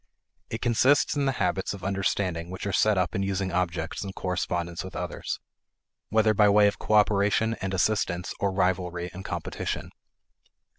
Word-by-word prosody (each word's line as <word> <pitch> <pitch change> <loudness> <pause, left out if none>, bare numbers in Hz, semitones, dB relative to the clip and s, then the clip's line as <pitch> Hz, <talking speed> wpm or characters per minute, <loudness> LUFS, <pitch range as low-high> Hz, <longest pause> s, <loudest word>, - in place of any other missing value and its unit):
It 115 - -4
consists 125 +6 +3
in 145 -1 +1
the 135 - +2
habits 95 -5 -1
of 100 - -12
understanding, 95 -3 -1
which 95 +1 -6
are 100 - -2
set 105 +2 +3
up 90 -2 0
in 100 - -1
using 95 -1 -1
objects 90 -1 -2
in 95 -1 -6
correspondence 85 -2 -2
with 95 - -9
others, - - -4 0.7
whether 110 0 +3
by 105 0 +5
way 105 +1 +6
of 100 - +1
cooperation 105 +1 +3
and 95 0 -2
assistance 90 -2 0
or 100 - +1
rivalry 90 -2 -1
and 95 +1 -8
competition. - - -4
95 Hz, 160 wpm, -27 LUFS, 90-105 Hz, 0.7 s, way